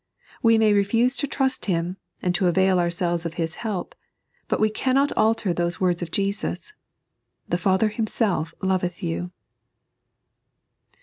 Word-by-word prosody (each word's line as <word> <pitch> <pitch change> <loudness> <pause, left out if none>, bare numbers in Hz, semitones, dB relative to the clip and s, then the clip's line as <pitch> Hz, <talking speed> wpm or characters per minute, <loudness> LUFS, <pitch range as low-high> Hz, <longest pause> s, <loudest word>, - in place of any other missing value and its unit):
We 230 -1 +5
may 220 -1 +4
refuse 230 +6 +2
to 285 - -1
trust 270 0 -1
Him, 175 0 -1 0.3
and 180 - +1
to 190 0 +2
avail 190 +1 +3
ourselves 175 0 0
of 170 -1 -5
His 165 -2 -2
help, 210 -6 -3 0.5
but - - 0
we 215 0 +3
cannot 270 +5 +1
alter 215 -4 +2
those 170 0 -1
words 180 -2 +1
of 175 - -4
Jesus: 200 - -2 0.4
" - - -52
The 175 - +1
Father 190 +3 +2
Himself 210 -6 -1
loveth 185 -2 -1
you." 85 +2 -2
190 Hz, 145 wpm, -24 LUFS, 175-220 Hz, 0.5 s, We